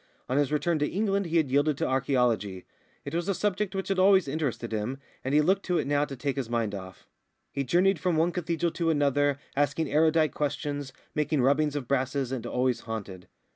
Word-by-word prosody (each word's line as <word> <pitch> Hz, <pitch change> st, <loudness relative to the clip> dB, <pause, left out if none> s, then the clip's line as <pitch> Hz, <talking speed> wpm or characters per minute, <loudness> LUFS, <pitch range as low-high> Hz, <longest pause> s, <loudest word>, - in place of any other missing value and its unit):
On 130 Hz, -, -1 dB
his 145 Hz, -1 st, +2 dB
return 155 Hz, +2 st, +1 dB
to 150 Hz, -, +1 dB
England 200 Hz, -1 st, 0 dB
he 170 Hz, +1 st, +1 dB
had 150 Hz, -5 st, +1 dB
yielded 145 Hz, +1 st, +2 dB
to -, -, 0 dB
archæology; 125 Hz, -8 st, 0 dB, 0.4 s
it -, -, -6 dB
was 170 Hz, +3 st, -1 dB
a 195 Hz, -, +1 dB
subject 205 Hz, 0 st, -1 dB
which 190 Hz, 0 st, -3 dB
had 195 Hz, -1 st, +1 dB
always 190 Hz, -3 st, +5 dB
interested 135 Hz, -5 st, -2 dB
him, 110 Hz, +5 st, -2 dB, 0.3 s
and 130 Hz, -, -2 dB
he 150 Hz, -, +6 dB
looked 190 Hz, +5 st, +2 dB
to 180 Hz, -1 st, +2 dB
it -, -, 0 dB
now 145 Hz, +1 st, +2 dB
to 140 Hz, -, -7 dB
take 140 Hz, +1 st, -3 dB
his 130 Hz, -4 st, -3 dB
mind 115 Hz, -3 st, -1 dB
off. 95 Hz, -1 st, -8 dB, 0.5 s
He 140 Hz, -, -2 dB
journeyed 180 Hz, +6 st, +3 dB
from 180 Hz, -2 st, 0 dB
one 165 Hz, +2 st, +3 dB
cathedral 170 Hz, -1 st, -1 dB
city -, -, -12 dB
to 165 Hz, -1 st, +1 dB
another, 145 Hz, -2 st, +2 dB, 0.2 s
asking 145 Hz, +2 st, 0 dB
erudite 155 Hz, -1 st, +3 dB
questions, 145 Hz, -1 st, -3 dB, 0.2 s
making 150 Hz, -3 st, +1 dB
rubbings 145 Hz, +2 st, +2 dB
of 140 Hz, -4 st, -3 dB
brasses, 130 Hz, 0 st, 0 dB
and 130 Hz, -3 st, -3 dB
always 125 Hz, -1 st, 0 dB
haunted. 100 Hz, -5 st, -7 dB
145 Hz, 210 wpm, -28 LUFS, 130-165 Hz, 0.5 s, he